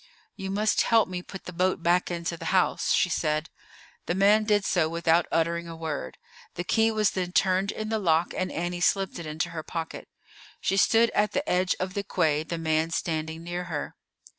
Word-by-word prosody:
"You 195 Hz, -, -6 dB
must 210 Hz, +2 st, +2 dB
help 225 Hz, -1 st, +4 dB
me 180 Hz, -1 st, -5 dB
put 195 Hz, +1 st, -10 dB
the 180 Hz, -, -7 dB
boat 185 Hz, 0 st, 0 dB
back 175 Hz, +1 st, +2 dB
into 170 Hz, -1 st, -3 dB
the -, -, -9 dB
house," 185 Hz, -1 st, +1 dB
she -, -, +4 dB
said. 155 Hz, -2 st, -1 dB, 0.6 s
The 175 Hz, -, 0 dB
man 205 Hz, +3 st, +4 dB
did 205 Hz, -2 st, +2 dB
so 160 Hz, -4 st, +2 dB
without 170 Hz, 0 st, +2 dB
uttering 170 Hz, +1 st, 0 dB
a 165 Hz, -, -7 dB
word. 160 Hz, -3 st, -5 dB, 0.4 s
The 175 Hz, -, -3 dB
key 225 Hz, +4 st, +2 dB
was 215 Hz, -2 st, +2 dB
then 180 Hz, -2 st, -3 dB
turned 190 Hz, +1 st, +2 dB
in 215 Hz, 0 st, -5 dB
the 220 Hz, -1 st, 0 dB
lock, 170 Hz, -3 st, +2 dB
and 185 Hz, -, -2 dB
Annie 175 Hz, +1 st, -3 dB
slipped 195 Hz, 0 st, +1 dB
it 165 Hz, -, -6 dB
into 160 Hz, +3 st, -2 dB
her 165 Hz, -1 st, -4 dB
pocket. 165 Hz, +1 st, -6 dB, 0.5 s
She 195 Hz, -, 0 dB
stood 225 Hz, +3 st, +4 dB
at 210 Hz, 0 st, +1 dB
the 290 Hz, +2 st, -1 dB
edge 180 Hz, +1 st, +2 dB
of 185 Hz, 0 st, -3 dB
the 200 Hz, -, -1 dB
quay, 155 Hz, -6 st, +1 dB
the 165 Hz, +2 st, -4 dB
man 160 Hz, 0 st, 0 dB
standing 160 Hz, -1 st, -3 dB
near 175 Hz, +1 st, -4 dB
her. 150 Hz, -4 st, -5 dB
175 Hz, 205 wpm, -27 LUFS, 165-195 Hz, 0.6 s, help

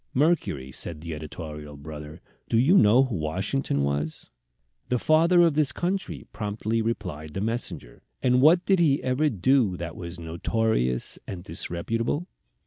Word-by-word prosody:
"Mercury," 130 Hz, -, +1 dB
said 75 Hz, +3 st, -3 dB
the 85 Hz, 0 st, -5 dB
editorial 75 Hz, -1 st, -8 dB
brother, 75 Hz, +2 st, -9 dB, 0.3 s
"do 115 Hz, -, +2 dB
you 140 Hz, +11 st, +5 dB
know 120 Hz, -, +6 dB
who 130 Hz, -5 st, -3 dB
Washington 80 Hz, -, -1 dB
was?" 70 Hz, +2 st, -3 dB, 0.6 s
"The 125 Hz, -, +2 dB
father 165 Hz, +6 st, +4 dB
of 165 Hz, -4 st, +4 dB
his 150 Hz, -3 st, +3 dB
country," 185 Hz, +6 st, -3 dB
promptly 110 Hz, +1 st, -2 dB
replied 90 Hz, -9 st, -4 dB
the 95 Hz, -, -2 dB
messenger. 100 Hz, -, -4 dB, 0.2 s
"And 125 Hz, 0 st, +4 dB
what 170 Hz, +5 st, +5 dB
did 190 Hz, -2 st, +3 dB
he 145 Hz, -5 st, +3 dB
ever 130 Hz, +4 st, +2 dB
do 110 Hz, -2 st, +2 dB
that 85 Hz, -1 st, -6 dB
was 85 Hz, 0 st, -7 dB
notorious 85 Hz, -, 0 dB
and 90 Hz, -3 st, -6 dB
disreputable?" 115 Hz, -, -2 dB
105 Hz, 145 wpm, -26 LUFS, -, 0.6 s, know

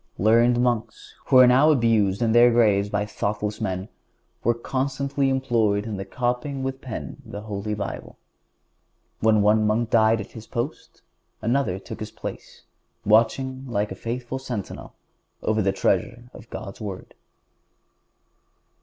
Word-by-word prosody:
Learned 115 Hz, +4 st, +4 dB
monks, 120 Hz, -2 st, -2 dB
who 130 Hz, -, +5 dB
are 130 Hz, -, +9 dB
now 130 Hz, +5 st, +5 dB
abused 115 Hz, -7 st, +2 dB
in 115 Hz, -, +2 dB
their 120 Hz, +1 st, +7 dB
graves 105 Hz, -4 st, +3 dB
by 105 Hz, 0 st, -1 dB
thoughtless 105 Hz, +1 st, -3 dB
men, 95 Hz, -2 st, -2 dB, 0.6 s
were 120 Hz, +1 st, +2 dB
constantly 135 Hz, +2 st, -1 dB
employed 115 Hz, -6 st, +1 dB
in 105 Hz, -4 st, -4 dB
copying 125 Hz, +5 st, -2 dB
with 135 Hz, 0 st, -4 dB
the -, -, -15 dB
pen 115 Hz, -, -6 dB
the 105 Hz, -, -8 dB
Holy 105 Hz, 0 st, -4 dB
Bible. 100 Hz, -1 st, -6 dB, 1.0 s
When 110 Hz, -2 st, +3 dB
one 105 Hz, +1 st, +4 dB
monk 115 Hz, +2 st, 0 dB
died 110 Hz, 0 st, +4 dB
at 110 Hz, -, -7 dB
his 110 Hz, -1 st, -11 dB
post 120 Hz, +6 st, -5 dB, 0.4 s
another 120 Hz, -4 st, 0 dB
took 95 Hz, -, -9 dB
his -, -, -5 dB
place, -, -, -9 dB, 0.4 s
watching 130 Hz, +5 st, +2 dB
like 105 Hz, -3 st, -1 dB
a -, -, -4 dB
faithful 125 Hz, +2 st, -4 dB
sentinel 120 Hz, -7 st, -6 dB, 0.5 s
over 110 Hz, 0 st, +1 dB
the 95 Hz, -1 st, +2 dB
treasure 120 Hz, +6 st, -1 dB
of 115 Hz, -, -13 dB
God's 100 Hz, +3 st, -8 dB
Word. 100 Hz, -3 st, -7 dB
115 Hz, 145 wpm, -24 LUFS, 105-125 Hz, 1.0 s, are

